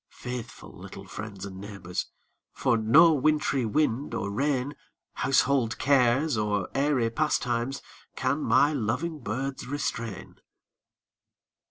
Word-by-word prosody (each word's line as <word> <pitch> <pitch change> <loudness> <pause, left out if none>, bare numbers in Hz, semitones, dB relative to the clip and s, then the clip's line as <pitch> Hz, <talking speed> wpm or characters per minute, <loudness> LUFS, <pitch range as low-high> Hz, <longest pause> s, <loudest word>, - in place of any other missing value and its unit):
Faithful 125 -2 -7
little - - -10
friends 100 -2 -7
and 95 -1 -8
neighbors, 100 -3 -5 0.5
For - - +1
no 140 +10 +6
wintry 150 -3 +1
wind 140 +2 0
or 100 - -2
rain, 140 +4 0 0.4
Household 135 -3 +2
cares 130 +2 +3
or 105 -3 -1
airy 135 -5 +1
pastimes, 125 -2 -1 0.3
Can 135 +3 0
my 135 +5 +4
loving 145 +6 -2
birds 130 +3 -4
restrain. 115 -6 -4
125 Hz, 110 wpm, -27 LUFS, 110-145 Hz, 0.5 s, no